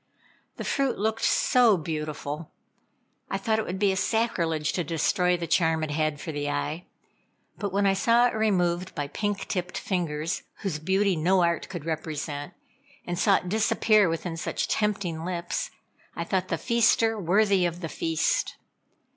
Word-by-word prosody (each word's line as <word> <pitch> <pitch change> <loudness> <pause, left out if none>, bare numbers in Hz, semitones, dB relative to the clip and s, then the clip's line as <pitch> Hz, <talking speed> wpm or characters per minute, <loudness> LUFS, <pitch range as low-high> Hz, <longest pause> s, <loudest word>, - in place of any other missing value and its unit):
The - - -4
fruit 275 -2 0
looked 220 +2 -1
so 240 -5 +4
beautiful. 150 -1 -4 0.8
I 195 - -1
thought 220 +3 0
it 220 - -2
would 180 - -3
be 200 0 +3
a - - -1
sacrilege 175 -8 0
to 175 - 0
destroy 180 +3 +1
the 170 - -4
charm 160 -1 +2
it 155 - -2
had 155 -1 0
for 160 - -5
the 145 -1 -3
eye; 160 +4 -3 0.7
but 200 -2 -2
when 200 +1 +1
I 195 - +4
saw 230 +5 +4
it 245 - +1
removed 185 -4 0
by 145 - -2
pink 205 +2 -2
tipped 180 -1 -3
fingers, 165 -3 -2 0.2
whose 185 -7 -2
beauty 190 +4 +2
no 180 +3 +3
art 170 -1 0
could 175 -5 -6
represent, 155 -2 -4 0.5
and 175 0 -3
saw 200 -1 +5
it 180 - -2
disappear 215 -1 +3
within 165 0 -3
such - - -2
tempting 190 -6 -1
lips. 180 - -3 0.5
I 170 - -2
thought 185 +2 -1
the 165 - -1
feaster 225 +1 +2
worthy 195 0 +3
of 175 +1 -6
the 165 - -3
feast. 355 - 0
180 Hz, 165 wpm, -26 LUFS, 160-205 Hz, 0.8 s, saw